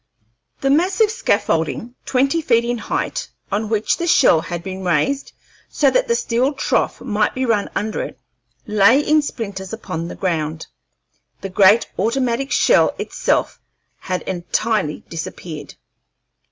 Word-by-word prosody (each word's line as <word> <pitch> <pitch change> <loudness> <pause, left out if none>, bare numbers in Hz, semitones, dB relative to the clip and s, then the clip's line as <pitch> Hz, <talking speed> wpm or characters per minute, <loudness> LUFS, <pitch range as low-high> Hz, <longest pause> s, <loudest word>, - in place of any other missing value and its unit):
The 270 - +2
massive 375 +8 +3
scaffolding, 205 - 0
twenty 275 +5 +2
feet 235 -5 +2
in 240 0 -1
height, - - -3 0.2
on 210 +2 -1
which 220 -1 +1
the 345 - -2
shell 250 - +5
had 170 0 -5
been 190 +1 -6
raised 180 - 0 0.4
so - - +2
that - - +2
the 470 - +2
steel 265 - 0
trough 275 - 0
might 210 -2 0
be 260 0 0
run 220 -4 +1
under 215 +1 -2
it, - - -7 0.5
lay 210 +3 +5
in 305 +1 +3
splinters 200 -9 -6
upon 170 -7 -5
the - - -7
ground. 160 -4 -2 0.8
The 195 - -5
great 195 +4 +5
automatic 245 +4 0
shell - - +4
itself - - -1 0.4
had 185 -1 -3
entirely 185 -1 -1
disappeared. 165 -1 -7
220 Hz, 140 wpm, -20 LUFS, 185-270 Hz, 0.8 s, shell